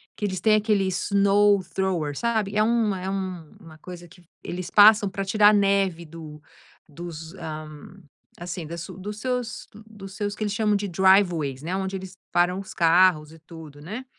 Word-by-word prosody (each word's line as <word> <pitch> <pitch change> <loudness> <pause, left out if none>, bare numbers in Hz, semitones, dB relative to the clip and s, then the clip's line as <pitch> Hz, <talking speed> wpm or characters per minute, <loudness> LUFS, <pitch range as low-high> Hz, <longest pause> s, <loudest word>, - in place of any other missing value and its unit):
que - - -10
eles 190 -2 -3
têm 215 -1 +4
aquele 210 -2 +1
snowthrower 190 -4 +1
sabe? 220 -4 -1
É 215 - +3
um 225 -2 +1
é 185 0 -5
uma 185 -3 -7
coisa 175 +1 -10
que 180 +1 -19 0.2
eles 180 0 -6
passam 210 -1 +6
pra 195 +1 -4
tirar 210 +1 +5
neve, 195 -4 +1
ah, - - -18
do 155 -2 -10 0.5
dos, 165 +1 -9
hã, 155 -4 -7 0.7
assim, 175 -1 -6
dos 185 +5 -7
seus 250 -2 -4 0.2
dos 195 -3 -11
seus, 205 -1 -3
que - - -3
eles 205 -1 -2
chamam 210 -1 +1
de 200 0 -4
driveways, 175 -7 +2
né, 175 +4 -3
onde 190 0 -3
eles 190 0 -10
param 175 +2 +1
os 195 - -11
carros 170 -3 +3
e 165 - -15
tudo, 160 -2 -13
né, 215 - -7
190 Hz, 170 wpm, -24 LUFS, 170-205 Hz, 0.7 s, passam